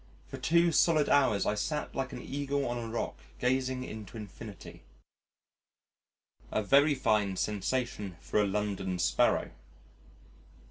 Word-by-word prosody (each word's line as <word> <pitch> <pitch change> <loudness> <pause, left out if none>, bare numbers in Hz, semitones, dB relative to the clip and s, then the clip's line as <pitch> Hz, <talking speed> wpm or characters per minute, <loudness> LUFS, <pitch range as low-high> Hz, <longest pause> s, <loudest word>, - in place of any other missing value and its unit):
For - - -8
two 170 +1 +3
solid 155 -1 +3
hours 135 -8 +3
I - - +2
sat 150 +8 -2
like 135 - -3
an - - -6
Eagle 140 0 -2
on 120 0 -2
a 115 - -5
rock 115 - -3 0.2
gazing 130 0 0
into 110 -2 -8
infinity 105 -1 -10 1.7
a 110 - 0
very 140 +6 +5
fine 105 -6 +1
sensation 105 -2 -2
for 105 - 0
a 105 - +2
London 95 -2 -2
Sparrow.... 60 -7 +2
115 Hz, 130 wpm, -30 LUFS, 105-140 Hz, 1.7 s, very